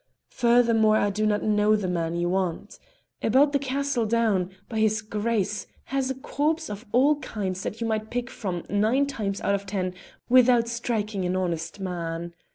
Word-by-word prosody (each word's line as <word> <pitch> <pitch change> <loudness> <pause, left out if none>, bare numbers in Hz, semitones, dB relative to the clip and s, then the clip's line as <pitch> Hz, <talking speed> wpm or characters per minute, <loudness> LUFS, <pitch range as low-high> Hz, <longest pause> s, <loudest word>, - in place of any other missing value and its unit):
Furthermore, 235 -3 +4
I 205 - +1
do 215 +2 0
not 210 -1 +1
know 210 0 +3
the 205 -3 -1
man 170 -2 -1
you 175 0 0
want. 190 +2 -2 0.4
About 275 +6 +4
the 280 - +3
castle 275 -3 -1
down 210 -5 +1 0.2
by 220 - -3
his 215 0 +2
Grace 210 -1 -2 0.2
has 270 -1 -1
a 265 - -2
corps 310 +4 -1
of 210 +4 -8
all 280 +5 +4
kinds 195 -9 -4
that 220 +4 -5
you - - 0
might 220 -1 -2
pick 245 0 -2
from 180 -5 -4
nine 220 +7 +2
times 210 -8 -3
out 200 - +1
of 200 0 -2
ten 185 -2 -2 0.3
without 250 -2 +5
striking 225 -4 -2
an 180 +1 0
honest 170 -1 -2
man. 170 -2 -4
215 Hz, 175 wpm, -26 LUFS, 190-240 Hz, 0.4 s, without